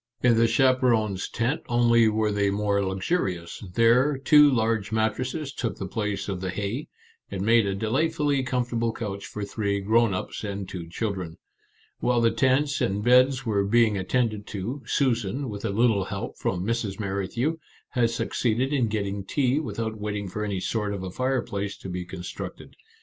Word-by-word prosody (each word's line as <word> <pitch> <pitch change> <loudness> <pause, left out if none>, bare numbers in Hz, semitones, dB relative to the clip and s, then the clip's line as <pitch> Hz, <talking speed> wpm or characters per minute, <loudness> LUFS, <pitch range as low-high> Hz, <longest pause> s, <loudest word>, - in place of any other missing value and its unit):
In 120 -2 +5
the 115 +1 +4
chaperons' 115 -5 +2
tent 125 +7 -1
only 115 -1 +4
were 110 0 +1
they 100 -1 +1
more 100 0 +1
luxurious; 95 - -2
there, 125 +5 +4
two 150 +2 +6
large 110 -4 0
mat 110 -1 +1
tresses 135 +3 -4
took 115 -6 -3
the 95 - -4
place 105 +1 -3
of 95 -3 -3
the 95 - -2
hay, 105 +9 -3 0.4
and 95 -1 -3
made 115 -1 +4
a 95 - -1
delightfully 145 +6 +1
comfortable 125 -2 -1
couch 100 -4 -5
for 105 -1 -5
three 100 -1 -1
grown 110 +3 +3
ups 90 - -5
and 100 -2 -4
two 85 -3 -7
children. 95 -4 -4 0.6
While 125 -1 +2
the 115 -1 +3
tents 135 +5 +2
and 100 +2 0
beds 130 +2 +4
were 105 -3 +1
being 110 +1 +3
attended 105 +2 -1
to, 115 +8 -4
Susan, 125 0 0
with 100 -1 -6
a - - 0
little 105 -2 +2
help 100 -1 -5
from 90 0 -1
Mrs. 110 -3 -2
Merrithew, 105 +10 -1 0.3
had 120 -2 +2
succeeded 120 +3 0
in 130 -5 +2
getting 100 -2 -2
tea 130 +6 +1
without 110 -7 -4
waiting 105 -1 -3
for 105 +3 -4
any 100 -3 -2
sort 105 -1 -1
of 95 - -6
a 95 - -5
fireplace 120 -4 -2
to 95 - -8
be 90 0 -4
constructed. 90 -1 -8
110 Hz, 170 wpm, -26 LUFS, 100-125 Hz, 0.6 s, two